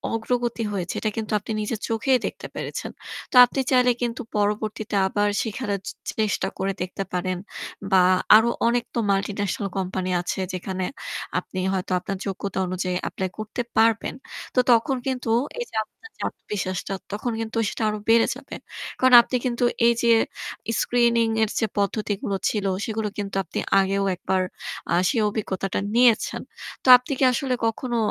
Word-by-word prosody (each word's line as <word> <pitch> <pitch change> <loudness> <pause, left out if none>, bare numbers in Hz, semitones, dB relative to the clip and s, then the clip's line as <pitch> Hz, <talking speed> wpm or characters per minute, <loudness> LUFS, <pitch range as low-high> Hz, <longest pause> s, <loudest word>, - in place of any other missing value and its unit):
অগ্রগতি 235 +1 -1
হয়েছে 185 -4 -3
এটা 215 - -1
কিন্তু 220 -1 -3
আপনি 210 - -7
নিজের 215 +1 -3
চোখেই 250 +4 +2
দেখতে - - -5
পেরেছেন। - - -5 0.4
তো - - -5
আপনি 245 - -4
চাইলে 250 -1 +5
কিন্তু 240 +1 -2 0.2
পরবর্তীতে 210 +1 -1
আবার 205 +2 +1
শিখানোর 210 -3 -3
চ - - -1 0.3
চেষ্টা 210 -3 +1
করে 195 0 -1
দেখতে 185 +2 -3
পারেন। 185 0 -1 0.5
বা 185 -1 +6 0.3
আরো 225 +2 +6 0.2
অনেক 240 0 +2
তো 235 - +1
মাল্টিন্যাশনাল 200 0 -1
কোম্পানি 185 0 -2
আছে 175 - -3
যেখানে 185 0 -3 0.5
আপনি 185 - -7
হয়তো 185 -1 -3
আপনার 195 +1 -4
যোগ্যতা 195 -1 -3
অনুযায়ী 185 0 -2
এপ্লাই 190 -1 -3
করতে 215 +3 -4 0.2
পারবেন। 225 0 +3 0.4
তো - - +4
তখন 240 +4 +3
কিন্তু 250 -3 -2
তো 260 +5 0
এইযে 480 - -6
আপনার 450 - -17
যে - - -13
আত্মবিশ্বাসটা 185 -2 -4 0.2
তখন 210 +4 -2
কিন্তু 225 0 -4
সেটা 225 - -4
আরো 210 - -2
বেড়ে 225 0 +6
যাবে। 275 +1 -9 0.4
কারণ 255 -1 +4
আপনি 255 - -4
কিন্তু 245 -1 0 0.2
এই 235 - +5
যে 235 - +4 0.7
স্ক্রিনিং 235 -1 +3 0.2
এর 220 - +1
যে 225 - +1
পদ্ধতিগুলো 200 0 -1
ছিল 210 -2 -2 0.2
সেগুলো 220 -1 -2
কিন্তু 200 -1 -4
আপনি 170 - -5 0.2
আগেও 195 +1 +1
একবার 185 +1 0 0.5
আ - - +3 0.2
সেই 235 -5 +1
অভিজ্ঞতাটা 195 -3 -2 0.2
নিয়েছেন। 240 -2 +3 0.4
তো - - -6
আপনি 250 +3 -9
কি - - +2
আসলে 260 +1 -1
কখনো 235 +2 -1
215 Hz, 160 wpm, -24 LUFS, 195-235 Hz, 0.7 s, বা